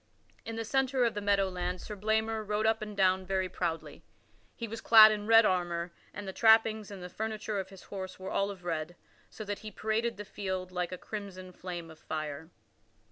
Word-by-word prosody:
In 225 - -5
the 225 0 -3
centre 265 +1 +2
of 230 - +1
the 205 - -3
meadow 200 -1 +2
land 180 0 -3
Sir 210 - -7
Blamor 220 +2 0
rode 210 +1 -1
up 220 0 +2
and 210 -1 -6
down 190 -1 +3
very 190 0 0
proudly. 170 -3 -4 0.5
He 230 - -5
was 225 +1 -6
clad 220 -1 +9
in 210 -1 -3
red 225 0 +7
armor, 175 -2 0 0.2
and 205 0 -7
the 190 - -4
trappings 220 -1 +4
and 195 -3 -8
the - - -5
furniture 215 +1 -3
of 190 0 -5
his 195 -2 -13
horse 190 -2 -7
were 190 0 -6
all 200 0 +1
of 190 -3 -8
red, 165 0 -3 0.3
so 215 - -8
that 205 0 -4
he 215 - -7
paraded 220 +2 -1
the 205 - -6
field 190 -2 -4
like 180 -1 -2
a 185 - -4
crimson 190 -3 -7
flame 175 -2 -7
of 160 - -15
fire. 155 0 -5
200 Hz, 210 wpm, -31 LUFS, 185-220 Hz, 0.5 s, clad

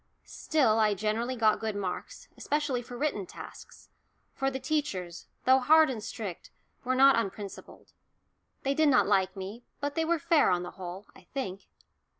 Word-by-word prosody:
Still 260 -9 +1
I 210 -2 +3
generally 220 +5 -1
got 220 -3 +3
good 220 -2 -3
marks, 200 - -5
especially 290 -4 -1
for 245 0 -9
written 240 -10 -1
tasks, - - -12 0.4
for 270 0 0
the 265 0 -4
teachers, 250 - -3 0.2
though 260 +1 +6
hard 315 +2 +5
and 220 -4 -5
strict, 205 -5 -6 0.3
were 255 +1 0
not 270 -2 +6
unprincipled. 200 -2 -7 0.7
They 275 - +1
did 310 +1 +3
not 260 - +5
like 195 -2 +2
me, 200 +5 -7 0.2
but 285 +1 -2
they 325 - 0
were 335 +1 +1
fair 330 -1 +3
on 175 0 +1
the 180 - -7
whole, 185 +1 -8
I - - -17
think. 195 -8 -4
240 Hz, 165 wpm, -29 LUFS, 200-280 Hz, 0.7 s, though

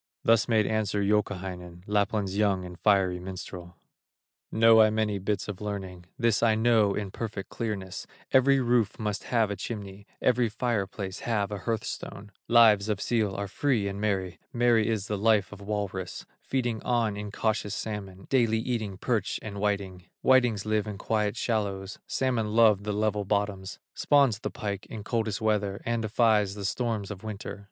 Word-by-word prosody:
Thus 115 0 +4
made 110 -3 +3
answer 105 -2 0
Youkahainen, 95 -4 -2
Lapland's 100 -1 0
young 100 -3 +1
and 90 -1 -10
fiery 95 -4 +3
minstrel: 90 -1 -8 0.7
"Know 115 0 +6
I 110 - +6
many 105 -2 0
bits 100 +2 -2
of 105 -2 -6
learning, 95 -4 -5
This 115 -3 +2
I 115 -2 +4
know 110 -3 +3
in 100 -2 -3
perfect 105 -2 -5
clearness: 100 -5 -4 0.2
Every 135 +1 +5
roof 120 -4 +1
must 105 -2 -3
have 115 -4 +1
a - - -2
chimney, 100 -2 -7
Every 125 -2 +2
fire 110 -2 -1
place 95 -1 -6
have 105 -4 -1
a 105 - -4
hearth 115 +2 -2
stone; 100 +1 -7 0.2
Lives 110 -3 +6
of 105 -3 0
seal 110 -5 0
are 100 0 -3
free 110 0 0
and 100 +1 -4
merry, 95 -4 -1
Merry 120 -3 +3
is 110 -4 -1
the 105 -1 -3
life 105 -2 +3
of 100 -1 -10
walrus, 100 -3 -4 0.2
Feeding 120 -4 -2
on 115 -4 0
incautious 105 0 -2
salmon, 95 -3 -6
Daily 115 -4 +3
eating 110 -4 -2
perch 110 -2 -1
and 100 -2 -6
whiting; 100 -3 -2 0.2
Whitings 120 -6 +4
live 110 -1 0
in 105 -2 -5
quiet 105 +1 -1
shallows, 100 -4 -2
Salmon 115 -5 -1
love 105 -3 +5
the 105 - -1
level 105 0 0
bottoms; 100 -1 -2 0.2
Spawns 140 -7 +3
the - - -3
pike 100 -1 -5
in 110 -2 -7
coldest 110 -1 -1
weather, 105 -2 0
And 115 0 0
defies 110 -2 +2
the 100 -1 -5
storms 110 -2 -2
of 100 -1 -8
winter. 105 -1 -6
105 Hz, 170 wpm, -28 LUFS, 100-115 Hz, 0.7 s, Know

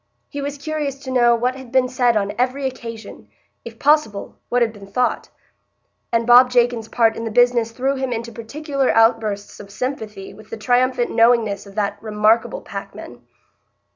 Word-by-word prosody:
He 285 - -5
was 285 +1 -4
curious 295 -1 -3
to 260 - -6
know 240 -2 +4
what 250 +2 -1
had 260 -3 -11
been 260 -1 +3
said 245 -2 +2
on 205 -1 -1
every 260 +2 0
occasion; 230 -4 -7 0.4
if 230 -1 -10
possible, 280 -8 +1
what 245 0 +2
had 225 -2 -2
been 200 -2 -13
thought; 250 +5 -1 0.8
and 230 0 +1
Bob 245 +1 +7
Jakin's 240 -2 +1
part 225 -1 +2
in 230 - -5
the 225 - -3
business 240 0 +3
threw 260 +4 -1
him 265 -2 -3
into 235 0 -4
peculiar 275 +5 -3
outbursts 225 -3 +1
of 200 - -11
sympathy 215 -4 -5
with 215 +2 -16
the 225 - -6
triumphant 245 +2 +1
knowingness 225 -4 +2
of 195 - -14
that 205 -2 -2
remarkable 220 - +1
packman. - - -9
240 Hz, 170 wpm, -20 LUFS, 220-255 Hz, 0.8 s, Bob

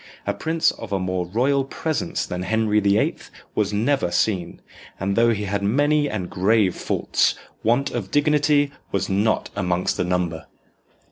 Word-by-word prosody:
A - - 0
prince 160 0 +1
of 115 -2 -10
a 100 - +1
more 90 -1 -2
"royal 135 +8 +1
presence" 160 +5 -2
than 90 -1 -4
Henry 110 +2 +1
the 100 0 +3
Eighth - - -1 0.2
was 105 -1 0
never 115 +1 +1
seen, 90 -2 -1 0.4
and 100 +1 -1
though 115 +1 +4
he 105 -2 -2
had 100 0 -2
many 145 +7 +2
and 95 -4 -3
grave 95 0 +2
faults, - - +1 0.3
want 120 +5 +1
of 110 -6 -4
dignity 145 0 +3 0.2
was 100 0 -1
not 100 +3 +1
amongst 90 -2 0
the - - +1
number. 90 -3 -2
105 Hz, 160 wpm, -23 LUFS, 95-140 Hz, 0.4 s, though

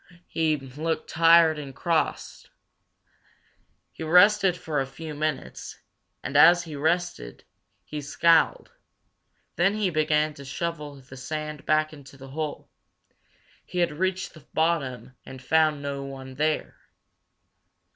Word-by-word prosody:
He 160 -2 0
looked 150 +4 -4
tired 165 -1 +5
and 135 -3 -8
cross. 165 -2 -2 1.4
He - - -14
rested 180 +3 +5
for 155 -4 -3
a 135 - -3
few 155 +3 -8
minutes, 150 - -4 0.5
and 140 - -5
as 170 +4 +7
he 160 -3 -8
rested, 160 - -2 0.4
he 150 -1 -6
scowled. 165 +3 +2 0.9
Then 195 +4 +3
he 205 -4 0
began 155 -1 +1
to 140 - -11
shovel 150 +1 -5
the 135 -1 -13
sand 155 +2 -6
back 155 0 +2
into 140 -2 -14
the 135 0 -12
hole. 150 +1 -5 1.0
He - - -9
had 175 -2 +2
reached 185 +4 -2
the 155 - -15
bottom 150 -6 -1
and 130 - -10
found 155 +2 +2
no 140 -1 -4
one 135 -1 -8
there. 155 +3 -1
155 Hz, 125 wpm, -26 LUFS, 140-165 Hz, 1.4 s, as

